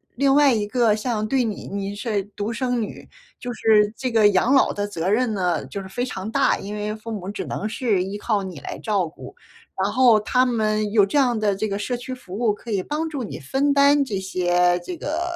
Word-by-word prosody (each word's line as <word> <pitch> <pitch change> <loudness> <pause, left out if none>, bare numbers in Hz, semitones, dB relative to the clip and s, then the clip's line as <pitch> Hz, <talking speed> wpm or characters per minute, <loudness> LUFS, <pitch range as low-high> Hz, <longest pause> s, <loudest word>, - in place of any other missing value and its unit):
另 275 +1 +3
外 285 -1 +5
一 215 -2 0
个 225 -1 +2
像 215 -1 -2
对 260 +1 +1
你 215 -3 -4
你 200 0 -4
是 205 -2 -2
独 205 +2 -3
生 245 0 -1
女， 210 - -7 0.3
就 245 0 -5
是 215 -2 +3
这 255 0 -3
个 215 -2 +5
养 200 +6 +2
老 - - +4
的 205 0 -2
责 175 -3 -4
任 225 +3 +2
呢， 180 -5 0
就 200 - -6
是 190 - -9
非 245 +6 -3
常 210 -3 -5
大， - - +2
因 205 +2 -7
为 210 0 -3
父 225 +1 -8
母 195 -3 -5
只 205 - -5
能 215 - -4
是 215 -6 0
依 195 +2 -5
靠 210 -1 0
你 185 -6 -7
来 - - -7
照 200 -6 0
顾。 160 - -12 0.5
然 200 - 0
后 240 -1 +5
他 250 +4 +2
们 215 -3 0
有 205 -2 +5
这 290 - -1
样 245 -4 +2
的 205 -2 +1
这 215 +2 -2
个 200 - -2
社 245 +4 -2
区 250 +2 -7
服 190 -7 -10
务， 235 -2 +2
可 225 +3 -9
以 195 -3 +1
帮 305 - -2
助 280 -5 -4
你 - - -6
分 275 - 0
担 280 0 +5
这 215 - -4
些 180 -1 +1
这 350 - -5
个 315 +2 -3
215 Hz, 255 characters per minute, -23 LUFS, 200-245 Hz, 0.5 s, 外